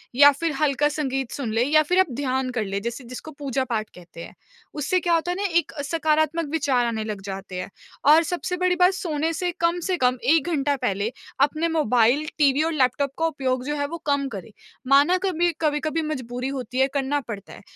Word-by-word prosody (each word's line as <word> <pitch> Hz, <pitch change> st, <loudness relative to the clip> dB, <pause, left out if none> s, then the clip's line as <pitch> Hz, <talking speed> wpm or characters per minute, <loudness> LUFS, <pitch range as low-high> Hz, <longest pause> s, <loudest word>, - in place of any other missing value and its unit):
या 285 Hz, +2 st, +8 dB
फिर 320 Hz, +4 st, -2 dB
हल्का 295 Hz, 0 st, +2 dB
संगीत 270 Hz, -4 st, -2 dB
सुन 255 Hz, -6 st, -4 dB
लें 225 Hz, +2 st, +2 dB
या 310 Hz, +3 st, +5 dB
फिर 360 Hz, +5 st, +1 dB
आप 355 Hz, -8 st, +3 dB
ध्यान 260 Hz, -1 st, -1 dB
कर 220 Hz, -, +1 dB
ले, 195 Hz, 0 st, -2 dB
जैसे 235 Hz, +5 st, -5 dB
जिसको 255 Hz, +6 st, -9 dB
पूजा-पाठ 260 Hz, -6 st, -2 dB
कहते 170 Hz, -1 st, -12 dB
हैं। -, -, -11 dB, 0.4 s
उससे 305 Hz, +5 st, 0 dB
क्या 345 Hz, -1 st, 0 dB
होता 335 Hz, +2 st, +1 dB
है 360 Hz, -, -2 dB
ना 405 Hz, -, -2 dB, 0.2 s
एक -, -, -6 dB
सकारात्मक 315 Hz, +1 st, +1 dB
विचार 275 Hz, -6 st, +1 dB
आने 225 Hz, -2 st, -2 dB
लग 210 Hz, -2 st, -5 dB
जाते 195 Hz, -1 st, -7 dB
हैं, 185 Hz, -, -7 dB, 0.4 s
और 310 Hz, +3 st, +7 dB
सबसे 360 Hz, +2 st, -3 dB
बड़ी 365 Hz, 0 st, +2 dB
बात 360 Hz, +1 st, +4 dB
सोने 325 Hz, -4 st, -2 dB
से 355 Hz, +2 st, -1 dB
कम 340 Hz, +1 st, +1 dB
से 365 Hz, -1 st, 0 dB
कम 250 Hz, -1 st, +2 dB
1 305 Hz, +4 st, +3 dB
घंटा 285 Hz, -2 st, +1 dB
पहले 200 Hz, +4 st, -1 dB, 0.4 s
अपने 315 Hz, +3 st, -2 dB
मोबाइल, 250 Hz, +1 st, +3 dB
टीवी 285 Hz, 0 st, +3 dB
और 325 Hz, 0 st, -1 dB
लैपटॉप 275 Hz, 0 st, +1 dB
को 325 Hz, -, +1 dB
उपयोग 260 Hz, -5 st, -2 dB
जो 295 Hz, +1 st, -2 dB
है 285 Hz, -1 st, -1 dB
वो 335 Hz, +3 st, -6 dB
कम 280 Hz, -1 st, +1 dB
करें। 195 Hz, -, -10 dB, 0.4 s
माना 285 Hz, +7 st, +5 dB
कभी 350 Hz, -1 st, +1 dB
कभी-कभी 310 Hz, +1 st, 0 dB
मज़बूरी 250 Hz, -1 st, -5 dB
होती 250 Hz, +1 st, -4 dB
है, 265 Hz, -, +4 dB
करना 280 Hz, +1 st, 0 dB
पड़ता 200 Hz, -3 st, -7 dB
है, -, -, -12 dB
285 Hz, 210 wpm, -24 LUFS, 250-320 Hz, 0.4 s, या